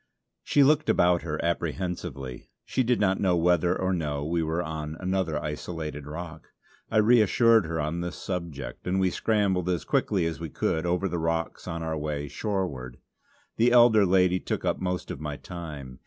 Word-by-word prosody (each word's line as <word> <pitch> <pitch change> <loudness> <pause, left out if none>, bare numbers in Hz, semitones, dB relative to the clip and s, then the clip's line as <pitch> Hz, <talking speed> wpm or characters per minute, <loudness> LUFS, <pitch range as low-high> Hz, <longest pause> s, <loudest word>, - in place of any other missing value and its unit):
She 145 - +4
looked 150 +2 +3
about 90 0 +4
her 75 -3 -4
apprehensively; 85 -6 -3 0.2
she - - 0
did 125 -1 +2
not 95 -2 +2
know 95 -3 +2
whether 85 +1 +2
or 95 0 0
no 75 -4 -2
we 85 +2 0
were 80 +2 -1
on 80 -1 -5
another 95 -4 -1
isolated 75 -1 -5
rock. 80 +1 -8 0.4
I 110 - 0
reassured 115 -2 +5
her 80 0 -2
on 75 +3 -2
this 85 0 -4
subject, 85 -10 -5
and 95 +1 +1
we 95 -1 +2
scrambled 95 -4 +1
as 90 -2 -1
quickly 95 -5 +1
as 80 -1 -3
we 80 -1 -5
could 80 +3 -1
over 90 +2 +1
the 85 -2 -2
rocks 80 +2 -2
on 85 -2 -4
our 80 -1 -2
way 75 -1 -3
shoreward. 75 - -3 0.6
The 120 +2 +4
elder 120 -3 +6
lady 90 -1 +3
took - - -3
up - - 0
most 90 -1 -3
of - - -7
my 75 -2 -4
time. 75 -7 -8
85 Hz, 180 wpm, -27 LUFS, 80-95 Hz, 0.6 s, elder